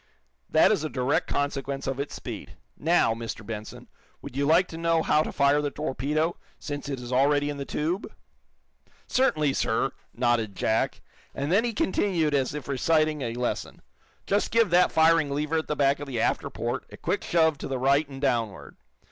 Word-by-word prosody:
That -, -, +5 dB
is -, -, +1 dB
a 155 Hz, -, -2 dB
direct 130 Hz, +1 st, 0 dB
consequence 140 Hz, -1 st, -2 dB
of 135 Hz, 0 st, -2 dB
its 140 Hz, -, -4 dB
speed. -, -, -8 dB, 0.2 s
Now, 160 Hz, -7 st, +2 dB
Mr. 115 Hz, -1 st, -6 dB
Benson, 110 Hz, -1 st, -7 dB, 0.3 s
would 140 Hz, -3 st, -10 dB
you 140 Hz, +1 st, +1 dB
like 170 Hz, +4 st, +4 dB
to 165 Hz, -, -7 dB
know 165 Hz, -1 st, +2 dB
how 150 Hz, -, +3 dB
to -, -, -3 dB
fire 140 Hz, +1 st, +3 dB
the 145 Hz, -, -1 dB
torpedo, 150 Hz, +3 st, -1 dB, 0.2 s
since 145 Hz, -1 st, -6 dB
it 135 Hz, -2 st, -3 dB
is 125 Hz, +1 st, -6 dB
already 145 Hz, +2 st, +3 dB
in 145 Hz, -, -6 dB
the 140 Hz, -, -4 dB
tube?" 170 Hz, +9 st, -2 dB, 0.9 s
"Certainly, 155 Hz, -, +2 dB
sir," 120 Hz, +3 st, 0 dB, 0.2 s
nodded 120 Hz, -4 st, 0 dB
Jack. 110 Hz, +4 st, 0 dB, 0.3 s
And 140 Hz, +3 st, -2 dB
then 205 Hz, +5 st, +4 dB
he 240 Hz, -, 0 dB
continued 180 Hz, -6 st, +1 dB
as 140 Hz, 0 st, 0 dB
if 150 Hz, -4 st, -6 dB
reciting 155 Hz, +2 st, +1 dB
a 115 Hz, -2 st, -3 dB
lesson: 125 Hz, 0 st, -3 dB, 0.4 s
"Just 205 Hz, +1 st, +1 dB
give 230 Hz, -5 st, +3 dB
that 180 Hz, +1 st, +5 dB
firing 160 Hz, -2 st, +4 dB
lever 150 Hz, +3 st, 0 dB
at 160 Hz, -, -6 dB
the 150 Hz, -, -1 dB
back 140 Hz, -1 st, +2 dB
of 145 Hz, -, -6 dB
the 125 Hz, -4 st, -3 dB
after -, -, 0 dB
port -, -, -3 dB
a -, -, -10 dB
quick -, -, -2 dB
shove 160 Hz, -3 st, +2 dB
to -, -, -5 dB
the 135 Hz, -, -2 dB
right 140 Hz, +3 st, +2 dB
and 135 Hz, -1 st, -8 dB
downward. 115 Hz, -7 st, -2 dB
145 Hz, 190 wpm, -26 LUFS, 135-160 Hz, 0.9 s, That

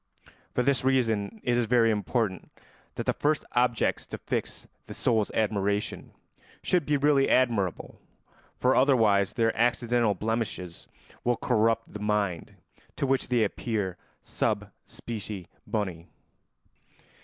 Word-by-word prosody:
For 125 Hz, -, +2 dB
this 135 Hz, -1 st, +2 dB
reason 125 Hz, -, +1 dB
it 120 Hz, -, +1 dB
is 120 Hz, -1 st, +1 dB
very 115 Hz, -1 st, +4 dB
important 105 Hz, -2 st, -1 dB, 0.5 s
that -, -, -4 dB
the -, -, +1 dB
first 150 Hz, 0 st, 0 dB
objects 120 Hz, -2 st, +1 dB
to -, -, -6 dB
fix -, -, -4 dB, 0.2 s
the -, -, -8 dB
soul's 110 Hz, -3 st, +1 dB
admiration 100 Hz, -1 st, -1 dB, 0.5 s
should 175 Hz, -6 st, +1 dB
be 150 Hz, -1 st, +3 dB
really 140 Hz, -1 st, +3 dB
admirable, 115 Hz, -8 st, +1 dB, 0.6 s
for 130 Hz, +1 st, +3 dB
otherwise 110 Hz, -7 st, +4 dB
their 115 Hz, -2 st, +1 dB
accidental 120 Hz, -2 st, +2 dB
blemishes 105 Hz, -4 st, -3 dB, 0.4 s
will 120 Hz, -1 st, +1 dB
corrupt 115 Hz, -1 st, +1 dB
the 105 Hz, -, -6 dB
mind 105 Hz, -5 st, -1 dB, 0.4 s
to -, -, -1 dB
which 135 Hz, 0 st, +1 dB
they 120 Hz, -2 st, +2 dB
appear 105 Hz, -3 st, -2 dB, 0.3 s
sub -, -, -2 dB, 0.2 s
specie 105 Hz, -5 st, -6 dB, 0.2 s
boni. 95 Hz, -6 st, -3 dB
115 Hz, 125 wpm, -27 LUFS, 105-125 Hz, 0.6 s, very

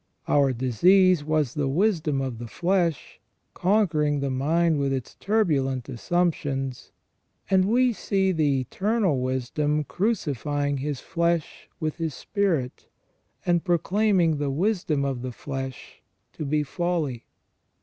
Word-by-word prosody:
Our 140 Hz, -2 st, +3 dB
disease 170 Hz, -, +4 dB
was 155 Hz, -4 st, 0 dB
the 145 Hz, -2 st, -1 dB
wisdom 155 Hz, -3 st, +1 dB
of 130 Hz, -4 st, -4 dB
the 120 Hz, -, -6 dB
flesh, 175 Hz, -, -1 dB, 0.3 s
conquering 170 Hz, -7 st, +2 dB
the 140 Hz, -1 st, -1 dB
mind 155 Hz, +4 st, +1 dB
with 140 Hz, -1 st, 0 dB
its 130 Hz, -3 st, -3 dB
turbulent 145 Hz, -, 0 dB
assumptions, 135 Hz, -2 st, -2 dB, 0.6 s
and 190 Hz, -1 st, +4 dB
we 245 Hz, +4 st, +3 dB
see 195 Hz, -2 st, 0 dB
the 145 Hz, -6 st, +1 dB
Eternal 195 Hz, -, 0 dB
Wisdom 135 Hz, +4 st, -1 dB
crucifying 145 Hz, -, -1 dB
His 140 Hz, 0 st, -3 dB
flesh 170 Hz, -2 st, -1 dB
with 155 Hz, -1 st, -2 dB
His 160 Hz, -4 st, -3 dB
spirit, 165 Hz, -7 st, -2 dB, 0.6 s
and 175 Hz, -1 st, +2 dB
proclaiming 180 Hz, -1 st, +2 dB
the 145 Hz, -1 st, -1 dB
wisdom 160 Hz, -2 st, 0 dB
of 135 Hz, -3 st, -2 dB
the 130 Hz, 0 st, -4 dB
flesh 135 Hz, +1 st, -7 dB, 0.3 s
to 155 Hz, -, -5 dB
be 150 Hz, +1 st, +1 dB
folly. 155 Hz, -5 st, -2 dB
150 Hz, 125 wpm, -25 LUFS, 135-180 Hz, 0.6 s, disease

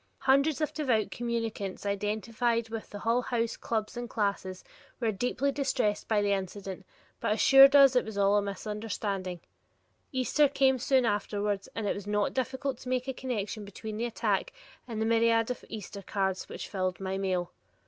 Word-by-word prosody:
Hundreds 275 Hz, +3 st, +3 dB
of 305 Hz, -, 0 dB
devout 250 Hz, -8 st, +1 dB
communicants 225 Hz, -5 st, -3 dB
identified 220 Hz, +3 st, -1 dB
with 225 Hz, -1 st, -5 dB
the 205 Hz, -, -7 dB
various -, -, -10 dB
Hull 235 Hz, +2 st, +2 dB
House 235 Hz, -2 st, -1 dB
clubs 220 Hz, -2 st, -3 dB
and 240 Hz, 0 st, -5 dB
classes 200 Hz, -3 st, -2 dB, 0.4 s
were 230 Hz, -3 st, +1 dB
deeply 250 Hz, +6 st, 0 dB
distressed 270 Hz, -7 st, 0 dB
by 210 Hz, -2 st, +2 dB
the 200 Hz, -, +1 dB
incident, 195 Hz, -1 st, -4 dB, 0.3 s
but -, -, -1 dB
assured 270 Hz, +5 st, +8 dB
us 275 Hz, -2 st, +8 dB
it 250 Hz, -, +4 dB
was 220 Hz, -2 st, -7 dB
all 200 Hz, 0 st, +4 dB
a 205 Hz, -, +4 dB
misunderstanding. 200 Hz, -2 st, -4 dB, 0.7 s
Easter 260 Hz, +3 st, +3 dB
came 265 Hz, -2 st, +3 dB
soon 260 Hz, 0 st, +3 dB
afterwards, 205 Hz, -1 st, -1 dB
and 225 Hz, -, -2 dB
it -, -, +1 dB
was 200 Hz, 0 st, -8 dB
not 210 Hz, -1 st, +1 dB
difficult 265 Hz, 0 st, -2 dB
to 250 Hz, -, -8 dB
make 255 Hz, 0 st, 0 dB
a 265 Hz, -, -1 dB
connection 225 Hz, -4 st, -4 dB
between 210 Hz, +2 st, -7 dB
the 235 Hz, -, -1 dB
attack 240 Hz, -, -1 dB, 0.4 s
and 225 Hz, -3 st, -4 dB
the 220 Hz, -, +1 dB
myriad 230 Hz, +1 st, +3 dB
of 250 Hz, -, -6 dB
Easter 205 Hz, -1 st, -7 dB
cards 190 Hz, -1 st, -2 dB
which -, -, -6 dB
filled 185 Hz, -2 st, -2 dB
my 190 Hz, 0 st, -3 dB
mail. 185 Hz, -2 st, -1 dB
220 Hz, 180 wpm, -29 LUFS, 200-250 Hz, 0.7 s, assured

